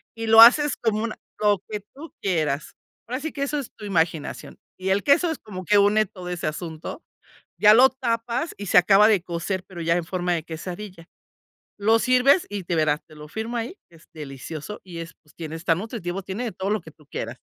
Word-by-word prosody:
y 225 0 -5
lo 225 0 +9
haces 285 +5 +7
como 220 -1 0
un 225 - -4 0.3
lo 205 -2 +3
que 210 -1 -4
tú 315 +4 -11
quieras. 155 -6 -1 0.3
Ahora 250 +3 -3
sí 315 +2 -4
que 280 - -2
eso 290 +1 -1
es 270 - -7
tu 215 - -10
imaginación 165 -5 -2 0.2
y 185 +1 -2
el 195 +1 +2
queso 290 +5 +4
es 320 - -4
como 185 -4 -8
que 205 +4 +4
une 205 +2 +4
todo 185 -3 -9
ese 175 -3 -3
asunto, 160 - -6 0.6
ya 210 0 +8
lo 255 +4 +7
tapas 240 +2 -2
y 205 - -6
se - - +4
acaba 195 +3 +6
de 210 -5 +3
cocer, 180 +2 -3
pero 175 -3 -9
ya 165 +1 +2
en 175 - 0
forma 180 0 -1
de 165 -2 -2
quesadilla. 175 +2 -8 0.7
Lo 220 +3 +4
sirves 255 +7 +4
y 205 -2 -4
de 175 - -2
veras, 155 -2 +2
te 155 - -16
lo 150 0 -11
firmo 220 +9 -4
ahí, 235 +11 -4
es 165 -1 -20
delicioso 155 +5 -7
y 175 -3 -9
es 165 0 -7
pues 150 - -25
tiene 160 -1 -6
está 165 0 +1
nutritivo, 195 -1 -5
tiene 195 +6 -5
de 235 - -3
todo 190 +2 -3
lo 215 0 +1
que 160 - -13
tú 150 -1 -23
quieras. - - -6
195 Hz, 220 wpm, -24 LUFS, 165-225 Hz, 0.7 s, lo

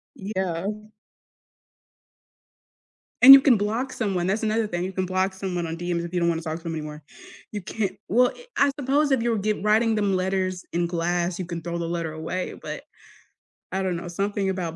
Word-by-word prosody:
Yeah. 190 -3 -3 2.5
And 270 +2 +13
you 275 - +10
can 255 -6 +5
block 225 +6 -2
someone, 190 -6 -1
that's 210 +4 0
another 220 +1 +1
thing, 175 -2 -3
you 190 +1 -4
can 185 0 -1
block 185 +1 0
someone 180 -3 -3
on 160 - -4
DMs 175 -1 -2
if 170 - -9
you 175 - 0
don't 170 - +3
wanna 165 0 -1
talk 160 0 -4
to 170 - -15
them 165 -1 -4
anymore, 150 -1 -6 0.5
you 205 -2 -4
can't 195 +1 -2 0.2
well, 245 +5 +4
eh 485 - -13
I 280 0 +4
suppose 285 +2 +1
if 260 -4 +3
you're 230 -2 +1
giv 210 0 -1
writing 220 +1 +3
them 200 -2 +1
letters 185 0 -1
in 170 0 0
class, 175 +1 -1
you 185 - -4
can 170 -1 -5
throw 170 0 -4
the 170 -1 -3
letter 165 -2 -3
away, 165 +4 -4
but, - - -6 0.9
I 190 - -1
don't 185 -2 -1
know, 175 - -7
something 195 +2 -1
about 175 -4 -3
185 Hz, 200 wpm, -24 LUFS, 170-210 Hz, 2.5 s, And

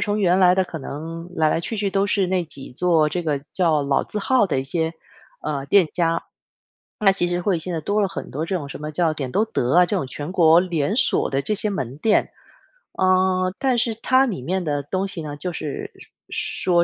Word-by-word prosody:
从 210 0 0
原 180 -2 +3
来 180 0 +6
的 190 - +2
可 175 -2 -7
能 165 +5 -7
来 155 -1 +3
来 165 - +1
去 225 - -4
去 200 -1 -1
都 195 +1 +1
是 200 -2 +1
那 185 -1 +1
几 140 -4 -11
座， 165 +1 +3
这 175 +3 -2
个 150 -3 0
叫 165 -5 +2
老 140 -1 +1
字 210 - -4
号 250 0 +3
的 150 - -1
一 130 - -2
些， 160 +3 -1 0.5
呃， 140 -2 -3
店 190 +1 +5
家。 165 -1 0 0.8
那 195 -2 +5
其 185 -2 +1
实 175 0 -1
会， 180 -3 +1
现 180 - -4
在 165 - -2
多 205 +6 0
了 200 - +2
很 195 - -7
多 150 +4 -3
这 185 +3 -2
种 145 -5 -6
什 140 - -8
么 150 0 -4
叫， 160 0 +1
点 135 -5 -4
都 215 - +2
德 140 - 0
啊， 180 0 +7
这 205 - -2
种 175 -9 -2
全 145 +6 -6
国 170 -2 +6
连 175 +1 -1
锁 255 - +1
的 135 0 -1
这 215 - 0
些 210 +1 -1
门 135 - -4
店。 215 +3 +2 0.7
嗯， 185 0 +2
但 260 -2 +2
是 230 -1 +1
它 260 +4 +3
里 200 - -3
面 185 +7 -2
的 145 -3 -1
东 185 +7 -2
西 190 -4 -6
呢， 145 -2 -6
就 175 +3 -4
是， 150 -2 -5 0.4
说 180 - -2
175 Hz, 250 characters per minute, -22 LUFS, 155-195 Hz, 0.8 s, 啊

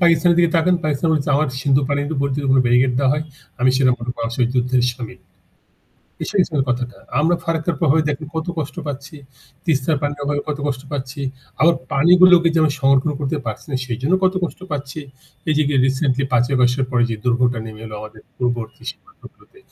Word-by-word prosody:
পাকিস্তানের 170 0 +4
দিকে 170 -1 +4
তাকান। 180 +2 +3
পাকিস্তান 155 +2 0
বলছে, 145 -2 -1
“আমার 155 +1 +1
সিন্ধু 140 +1 +3
পানিতে 145 +2 -1 0.2
যদি 145 -1 -2
কোনো 130 - +5
ব্যারিকেড 125 +1 +3
দেওয়া 135 -1 +3
হয়, 150 +1 -2 0.4
আমি 130 +1 +4
সেনা 130 -1 +4
প্রধান 120 -1 -4 0.3
যুদ্ধে 125 +1 +1
শামিল।” 120 -6 -9 1.0
এ - - 0
সেই 195 - +3
ছিল 155 -3 -2
কথাটা। 125 0 -2 0.2
আমরা 165 +3 +3
ফারাক্কার 165 0 -1
প্রভাবে 160 0 +3
দেখেন 150 +1 -3
কত 160 - -2
কষ্ট 155 +1 -4
পাচ্ছি, 145 +2 -6 0.5
তিস্তার 150 -1 +1
পানির 145 0 -2
অভাবে 145 0 -1
কত 150 -1 -2
কষ্ট 130 -3 -2
পাচ্ছি। 140 0 -5 0.4
আবার 170 +2 +5 0.2
পানিগুলোকে 175 +3 +6
যে - - +3
আমি 155 -2 +3
সংরক্ষণ 135 +2 +3
করতে 145 +2 -1
পারছি 110 -1 -5
না, 135 - 0
সেজন্য 130 +8 -1
কত 185 0 +3
কষ্ট 175 - -6
পাচ্ছি। 145 +1 -4 0.5
এই 155 - +3
যে 155 - +4 0.2
রিসেন্টলি 135 0 0
৫ই 125 +2 +2
আগস্টের 125 +1 +2
পরে 120 -2 +2
যে - - -1
দুর্ভোগটা 125 0 +2
নেমে 110 -1 -10
এলো 110 - -8
আমাদের 110 0 -10 0.2
পূর্বাঞ্চলীয় 120 -1 -3
সীমান্তগুলোতে, 420 -1 -18
140 Hz, 185 wpm, -20 LUFS, 125-155 Hz, 1.0 s, পানিগুলোকে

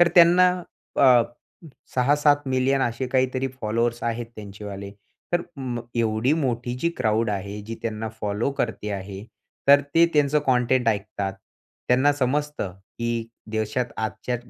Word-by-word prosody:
तर 175 - +7
त्यांना 175 +1 +7 0.6
अ, 125 -2 +7 0.7
6-7 145 +3 +4
मिलियन 130 +1 +2
असे 120 +2 -1
काहीतरी 130 0 +1
फॉलोवर्स 115 +2 0
आहेत 115 0 -2
त्यांचेवाले. 100 -1 -7 0.4
तर 175 0 +2
मग 120 -3 -4
एवढी 115 +4 +2
मोठी 120 -1 -1
जी 170 - +1
क्राउड 110 0 +1
आहे, 100 +1 -4
जी 115 +2 -6
त्यांना 110 0 -3
फॉलो 105 +6 -1
करते 110 -2 -2
आहे, 95 0 -6 0.5
तर 140 0 +9
ते 165 +1 +7
त्यांचं 150 0 +4
कंटेंट 125 -1 +3
ऐकतात. 100 -2 -1 0.6
त्यांना 130 +4 +4
समजतं, 145 -5 -1 0.3
की 115 -1 -2 0.2
देशात 110 +3 -1
आजच्या 110 +3 -2
120 Hz, 130 wpm, -24 LUFS, 110-135 Hz, 0.7 s, तर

